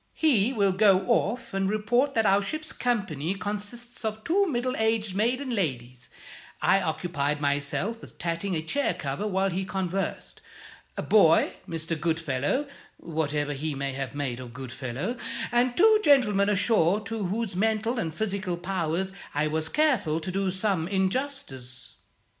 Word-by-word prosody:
He 255 -8 +3
will 200 -6 +2
go 195 -1 +5
off 210 +5 0
and 195 0 0
report 240 +7 +1
that 225 - +3
our 195 0 +4
ship's 310 +10 -3
company 190 - -1
consists 210 +5 -5
of 220 0 -3
two 390 +4 +2
middle 255 -3 -1
aged 220 -2 +1
maiden 250 +6 0
ladies 125 - -3 0.5
(I 195 - +4
occupied 155 -4 -1
myself 145 +10 -1
with - - -13
tatting 170 +3 -2
a 155 - -1
chair 280 - 0
cover 140 +8 -3
while 195 -1 +1
he 185 +2 -1
conversed); 190 0 -3 0.6
a - - -2
boy; 165 -7 +5 0.2
Mr. 165 -1 -3
Goodfellow 160 - 0 0.3
(whatever 150 -2 -2
he 150 +1 -3
may 135 0 -3
have 135 0 -5
made 135 -4 -3
of 125 -2 -9
Goodfellow); 130 - -4 0.3
and 240 +1 +2
two 435 +3 +6
gentlemen 210 -9 +4
ashore 200 -2 +3
to 215 -1 -4
whose 215 0 -2
mental 220 +4 +1
and 165 -6 -2
physical 195 -1 -2
powers 180 0 -2 0.2
I 150 +1 +2
was 155 +1 -1
careful 255 - +2
to 185 - -4
do 195 0 0
some 185 -3 0
injustice. 190 - -3
195 Hz, 150 wpm, -27 LUFS, 160-225 Hz, 0.6 s, two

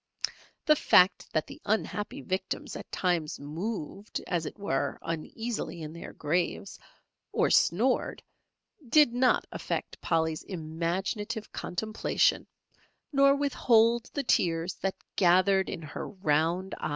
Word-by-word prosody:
The 305 - +6
fact 185 -9 +4
that 155 - 0
the - - -12
unhappy 220 +4 -2
victims 185 0 -3
at - - -9
times 170 -4 0
moved 185 +6 -5
as 170 -3 -1
it - - -8
were 145 -9 -1
uneasily 170 +2 -4
in 155 0 -7
their 170 - -8
graves 170 +3 -2 0.5
or - - +2
snored, 235 +10 +2 0.7
did 295 -2 +6
not 250 +1 +3
affect - - -4
Polly's 160 -1 0
imaginative 185 +6 -3
contemplation, 215 +4 0 0.7
nor 275 0 +6
withhold 235 -4 +3
the 285 - 0
tears 170 -6 +1
that 195 0 -1 0.2
gathered 190 +1 +4
in 170 -4 -5
her 150 - -6
round 180 0 0
eyes. - - -2
190 Hz, 120 wpm, -29 LUFS, 165-225 Hz, 0.7 s, The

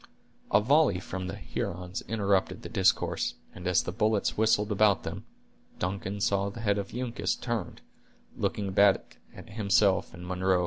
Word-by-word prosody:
A - - +6
volley 135 - +3
from 95 0 -5
the 95 - -5
Hurons 90 0 -4
interrupted 100 -3 0
the - - -7
discourse, - - +1 0.2
and 90 - -7
as 90 - +3
the - - -4
bullets 105 +1 +1
whistled 105 -1 +2
about 105 -1 +3
them, - - -6 0.5
Duncan 95 +2 -3
saw 100 0 +1
the 115 +3 -8
head 100 -2 +1
of 100 - -5
Uncas 125 -1 -1
turned, 120 -3 -4 0.5
looking 100 -2 -2
back 100 0 +3 0.2
at - - -12
himself 100 -2 +2
and 90 +1 -9
Munro. 90 0 +1
100 Hz, 160 wpm, -29 LUFS, 95-105 Hz, 0.5 s, A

